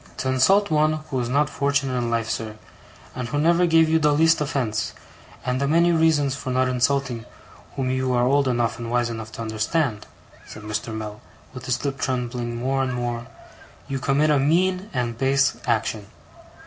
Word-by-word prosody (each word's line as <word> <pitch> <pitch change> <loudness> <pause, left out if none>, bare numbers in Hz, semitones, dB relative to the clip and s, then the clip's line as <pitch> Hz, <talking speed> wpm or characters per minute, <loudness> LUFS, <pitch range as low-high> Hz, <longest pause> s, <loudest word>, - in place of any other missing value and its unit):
'To 130 - -2
insult 190 +10 +3
one 155 0 +3
who 155 -4 -4
is 120 -1 -2
not 145 +3 +2
fortunate 140 -2 0
in 120 -1 -1
life, 115 -1 -1
sir, 110 -1 -4 0.6
and 125 -1 -4
who 145 - -3
never 170 +4 +3
gave 165 -1 +5
you 160 +1 +3
the 150 -1 +3
least 160 +2 +3
offence, 120 -6 -1 0.5
and 125 +1 -1
the 140 - +1
many 170 +3 +4
reasons 160 -4 +3
for 140 -1 -6
not 130 0 +2
insulting 125 -1 0 0.5
whom 130 -1 -1
you 130 0 0
are 120 -1 +2
old 140 +1 +3
enough 120 -2 0
and 115 -1 -5
wise 120 0 0
enough 110 -1 -7
to 115 - -6
understand,' 110 +2 -1 0.4
said 110 - -11
Mr. 105 +2 -4
Mell, 110 -1 -6 0.3
with 125 -1 -9
his 125 +2 -1
lips 135 -1 -3
trembling 120 -2 -2
more 135 +3 -1
and 130 -2 -1
more, 120 -1 -3 0.6
'you 135 -1 -3
commit 140 +4 +2
a 145 - +3
mean 180 +7 +1
and 120 -3 -2
base 135 0 +2
action. 110 -3 -1
130 Hz, 185 wpm, -23 LUFS, 120-145 Hz, 0.6 s, gave